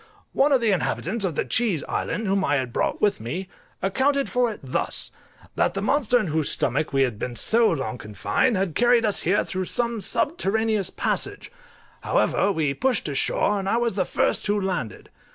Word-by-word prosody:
One 285 Hz, +2 st, +3 dB
of 265 Hz, -3 st, +4 dB
the 225 Hz, -2 st, +2 dB
inhabitants 195 Hz, +3 st, -1 dB
of 170 Hz, -5 st, -2 dB
the -, -, -1 dB
Cheese 215 Hz, -10 st, +1 dB
Island, 220 Hz, -, -3 dB
whom 195 Hz, 0 st, +1 dB
I 145 Hz, -, +2 dB
had 130 Hz, -4 st, -2 dB
brought -, -, -1 dB
with 205 Hz, -, +2 dB
me, 155 Hz, +13 st, -5 dB, 0.4 s
accounted 270 Hz, +8 st, +1 dB
for 245 Hz, -2 st, +2 dB
it 210 Hz, -, -9 dB
thus: 130 Hz, -, -2 dB, 0.4 s
that -, -, +1 dB
the 195 Hz, -, -1 dB
monster 250 Hz, 0 st, +2 dB
in 215 Hz, -, -1 dB
whose 155 Hz, -1 st, 0 dB
stomach 150 Hz, +5 st, 0 dB
we 135 Hz, -1 st, +3 dB
had 120 Hz, -5 st, -2 dB
been 120 Hz, 0 st, -4 dB
so 225 Hz, -, +3 dB
long 135 Hz, -5 st, -3 dB
confined 105 Hz, -, 0 dB
had 185 Hz, -3 st, -1 dB
carried 240 Hz, +2 st, +3 dB
us 210 Hz, -, +1 dB
here 185 Hz, +5 st, +1 dB
through 185 Hz, 0 st, -3 dB
some 235 Hz, +2 st, -1 dB
subterraneous 220 Hz, -, 0 dB
passage; -, -, -3 dB, 0.5 s
however, 200 Hz, -, +1 dB
we 155 Hz, -6 st, 0 dB
pushed 255 Hz, -, 0 dB
to 145 Hz, -, -3 dB
shore, 200 Hz, +8 st, +1 dB
and 195 Hz, 0 st, -3 dB
I 230 Hz, -, +2 dB
was 235 Hz, -4 st, 0 dB
the 190 Hz, -, +2 dB
first -, -, +1 dB
who 205 Hz, 0 st, +1 dB
landed. 180 Hz, -, -4 dB
195 Hz, 195 wpm, -24 LUFS, 150-230 Hz, 0.5 s, of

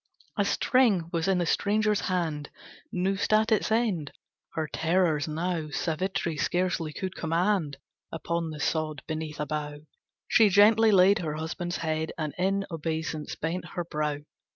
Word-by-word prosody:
A -, -, +1 dB
string 205 Hz, -10 st, +2 dB
was 165 Hz, +1 st, 0 dB
in 190 Hz, -1 st, +3 dB
the 175 Hz, -, +1 dB
stranger's 210 Hz, +4 st, +1 dB
hand 160 Hz, -5 st, -2 dB, 0.4 s
Noosed 190 Hz, +3 st, -1 dB
at 215 Hz, +1 st, +3 dB
its 220 Hz, 0 st, +2 dB
end. 210 Hz, -, 0 dB, 0.4 s
Her 160 Hz, -1 st, -1 dB
terrors 165 Hz, -2 st, +1 dB
now 160 Hz, 0 st, -2 dB
Savitri 165 Hz, +1 st, -2 dB
scarcely 175 Hz, -2 st, 0 dB
could 185 Hz, +4 st, -4 dB
command. 165 Hz, -2 st, 0 dB, 0.3 s
Upon 165 Hz, +1 st, -2 dB
the 155 Hz, -1 st, -7 dB
sod 155 Hz, -1 st, -1 dB
beneath 155 Hz, -1 st, -5 dB
a 150 Hz, -, -1 dB
bough, 150 Hz, 0 st, -4 dB, 0.5 s
She 220 Hz, -2 st, +5 dB
gently 215 Hz, +3 st, +6 dB
laid 195 Hz, +2 st, +5 dB
her 155 Hz, -4 st, -3 dB
husband's 170 Hz, +2 st, -4 dB
head, 160 Hz, -1 st, -2 dB
And 155 Hz, -2 st, -3 dB
in 195 Hz, +2 st, +1 dB
obeisance 160 Hz, -1 st, -3 dB
bent 165 Hz, +4 st, -3 dB
her 175 Hz, -, -1 dB
brow. 150 Hz, -2 st, -2 dB
170 Hz, 150 wpm, -27 LUFS, 155-195 Hz, 0.5 s, gently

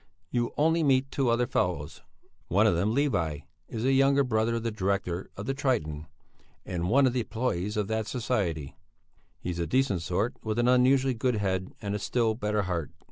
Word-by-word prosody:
You'll 120 Hz, -1 st, 0 dB
only 160 Hz, +3 st, +3 dB
meet 135 Hz, -2 st, +2 dB
two 135 Hz, -3 st, +1 dB
other 120 Hz, +1 st, +2 dB
fellows; 85 Hz, -, -2 dB, 0.5 s
one 100 Hz, +5 st, +3 dB
of 105 Hz, -, +4 dB
them, 100 Hz, +6 st, +1 dB
Levi, 85 Hz, -, 0 dB, 0.3 s
is 115 Hz, +1 st, -4 dB
a 135 Hz, -, +4 dB
younger 140 Hz, +1 st, +4 dB
brother 115 Hz, -2 st, +1 dB
of 115 Hz, -, -3 dB
the 115 Hz, -, -1 dB
director 95 Hz, -3 st, -2 dB
of 100 Hz, -, -5 dB
the 135 Hz, -, -1 dB
'Triton,' 80 Hz, -, -1 dB, 0.6 s
and 90 Hz, -1 st, -2 dB
one 135 Hz, +5 st, +5 dB
of 125 Hz, -, +2 dB
the 125 Hz, -2 st, 0 dB
employés 110 Hz, -3 st, -2 dB
of 105 Hz, -2 st, 0 dB
that 110 Hz, -1 st, -1 dB
society. 95 Hz, -, -2 dB, 0.6 s
He's 90 Hz, -1 st, -4 dB
a 85 Hz, -, -1 dB
decent 130 Hz, -9 st, +1 dB
sort, 90 Hz, +8 st, -1 dB
with 110 Hz, 0 st, -2 dB
an 120 Hz, 0 st, +2 dB
unusually 130 Hz, +1 st, +4 dB
good 125 Hz, +1 st, 0 dB
head 95 Hz, -3 st, -2 dB
and 100 Hz, 0 st, -2 dB
a 105 Hz, -, -2 dB
still 115 Hz, 0 st, +1 dB
better 105 Hz, -2 st, -1 dB
heart. 85 Hz, -5 st, -2 dB
110 Hz, 190 wpm, -28 LUFS, 95-125 Hz, 0.6 s, one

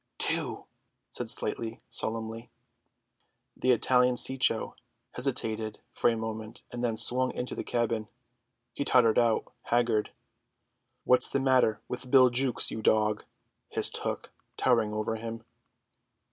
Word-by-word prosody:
"Two," -, -, -1 dB, 0.5 s
said -, -, -4 dB
Slightly 115 Hz, 0 st, -2 dB
solemnly. 115 Hz, +1 st, -3 dB, 1.1 s
The 130 Hz, -, -2 dB
Italian 125 Hz, +1 st, +3 dB
Cecco 125 Hz, -3 st, +3 dB, 0.4 s
hesitated 110 Hz, -4 st, -3 dB
for -, -, +2 dB
a 115 Hz, -, -1 dB
moment 110 Hz, 0 st, -6 dB
and 120 Hz, 0 st, -5 dB
then 115 Hz, -2 st, -1 dB
swung 125 Hz, +3 st, +3 dB
into 125 Hz, -, -4 dB
the -, -, -5 dB
cabin. 115 Hz, -2 st, -1 dB, 0.7 s
He 140 Hz, -, -2 dB
tottered 120 Hz, -5 st, +4 dB
out, 115 Hz, -1 st, 0 dB
haggard. 120 Hz, -3 st, +1 dB, 0.9 s
"What's 125 Hz, -, +3 dB
the 140 Hz, -, 0 dB
matter 130 Hz, -5 st, +2 dB
with 125 Hz, +1 st, -5 dB
Bill 130 Hz, -1 st, +6 dB
Jukes, 125 Hz, 0 st, +1 dB
you 110 Hz, -, -5 dB
dog?" 105 Hz, -1 st, +1 dB, 0.4 s
hissed -, -, +2 dB
Hook, -, -, -5 dB, 0.3 s
towering 115 Hz, -4 st, +2 dB
over 110 Hz, +1 st, -2 dB
him. 115 Hz, 0 st, -7 dB
115 Hz, 125 wpm, -28 LUFS, 110-125 Hz, 1.1 s, Bill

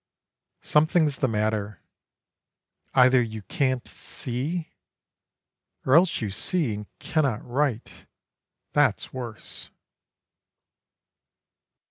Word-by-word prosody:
Something's 155 Hz, -1 st, +3 dB
the 130 Hz, -, +1 dB
matter: 105 Hz, -3 st, -1 dB, 1.2 s
either 130 Hz, 0 st, +6 dB
you 110 Hz, -3 st, -4 dB
can't 130 Hz, +2 st, -1 dB
see, 145 Hz, +6 st, -4 dB, 1.1 s
Or 130 Hz, -, +3 dB
else 175 Hz, +2 st, +4 dB
you 105 Hz, -3 st, -2 dB
see, 150 Hz, -, 0 dB
and 105 Hz, 0 st, -6 dB
cannot 140 Hz, -9 st, 0 dB
write 130 Hz, -2 st, -2 dB, 0.7 s
that's 145 Hz, -8 st, +2 dB
worse. 120 Hz, -4 st, -5 dB
130 Hz, 80 wpm, -26 LUFS, 110-150 Hz, 1.2 s, either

